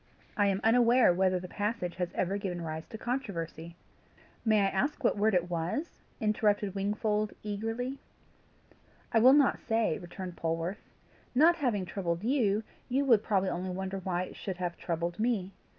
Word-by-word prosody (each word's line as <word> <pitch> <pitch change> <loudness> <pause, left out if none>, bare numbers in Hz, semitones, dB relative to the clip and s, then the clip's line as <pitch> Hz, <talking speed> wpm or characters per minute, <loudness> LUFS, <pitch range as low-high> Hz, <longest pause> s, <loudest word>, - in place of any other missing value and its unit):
I 205 -1 +3
am 195 0 0
unaware 240 -2 +5
whether 185 0 +2
the 180 - -7
passage 205 -3 -3
has 180 -1 -2
ever 190 +2 0
given 180 -3 -4
rise 160 0 -5
to 220 - -8
controversy." 170 -9 -4 0.7
"May 215 -2 +4
I - - +3
ask 260 +11 -1
what - - +3
word 210 0 +2
it 175 -1 +2
was?" 175 - -3 0.2
interrupted 210 -2 +1
Wingfold, 210 +1 -1
eagerly. 225 +6 -3 1.1
"I 225 - +4
will 255 +4 +8
not 285 -2 +4
say," 225 -7 0
returned 180 0 -7
Polwarth. 165 +3 -3 0.5
"Not 330 +6 +6
having 235 - 0
troubled 175 -1 -3
you, 220 -4 +2 0.3
you 270 +3 +1
would 230 -6 +5
probably 195 -3 +1
only 180 +2 -3
wonder 190 +1 -3
why 180 -1 -1
it - - -9
should 190 -3 -5
have 175 -1 -3
troubled 170 +2 -3
me. 215 -5 0
200 Hz, 165 wpm, -30 LUFS, 180-225 Hz, 1.1 s, will